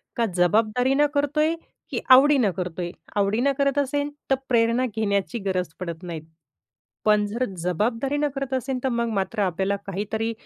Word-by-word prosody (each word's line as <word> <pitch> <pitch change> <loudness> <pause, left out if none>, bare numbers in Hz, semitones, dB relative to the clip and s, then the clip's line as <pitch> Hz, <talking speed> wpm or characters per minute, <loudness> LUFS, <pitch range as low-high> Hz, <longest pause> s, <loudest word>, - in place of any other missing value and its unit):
का 235 - +1
जबाबदारीनं 230 +9 +3
करतोय, 300 +3 +1 0.4
की - - -2
आवडीनं 260 -5 +6
करतोय? 175 -1 -3 0.2
आवडीनं 215 +7 +2
करत 280 0 +1
असेन, 285 +1 0 0.2
तर 270 - +4
प्रेरणा 235 +1 +3
घेण्याची 210 +1 0
गरज 185 -2 0
पडत 170 -1 -6
नाही, 165 -3 -5 0.8
पण 210 -1 +4
जर 235 +5 -1 0.2
जबाबदारीनं 240 - 0
करत 275 -1 -3
असेन, 260 0 -2
तर - - +3
मग 235 - 0
मात्र 200 +3 -3
आपल्याला 190 +2 0
काहीतरी 215 +4 -2
230 Hz, 145 wpm, -24 LUFS, 195-270 Hz, 0.8 s, आवडीनं